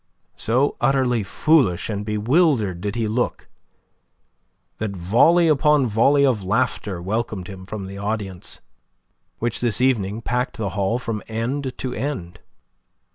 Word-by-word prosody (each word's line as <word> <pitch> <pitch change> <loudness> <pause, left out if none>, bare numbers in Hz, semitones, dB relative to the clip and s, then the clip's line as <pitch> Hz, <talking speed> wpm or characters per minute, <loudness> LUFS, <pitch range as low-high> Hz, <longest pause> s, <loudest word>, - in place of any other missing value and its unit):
So 130 +6 +1
utterly 125 -2 +2
foolish 105 - +2
and 105 -2 -3
bewildered 105 - +1
did 100 +1 -3
he 115 -2 0
look 120 +3 -2 1.3
that 105 -2 -3
volley 125 - +4
upon 150 -2 +4
volley 135 +6 +3
of 125 -6 +1
laughter 105 -2 -1
welcomed 100 0 -3
him 95 -2 -10
from 100 -1 -5
the 100 +1 -8
audience, 100 -3 -5 0.8
which 120 0 -2
this 120 -4 +1
evening 115 -4 +1
packed 125 +3 -2
the 105 -4 -2
hall 100 +4 0
from 115 -4 -4
end 125 +4 -3
to 125 -1 -4
end. 125 -13 -4
110 Hz, 130 wpm, -22 LUFS, 100-130 Hz, 1.3 s, volley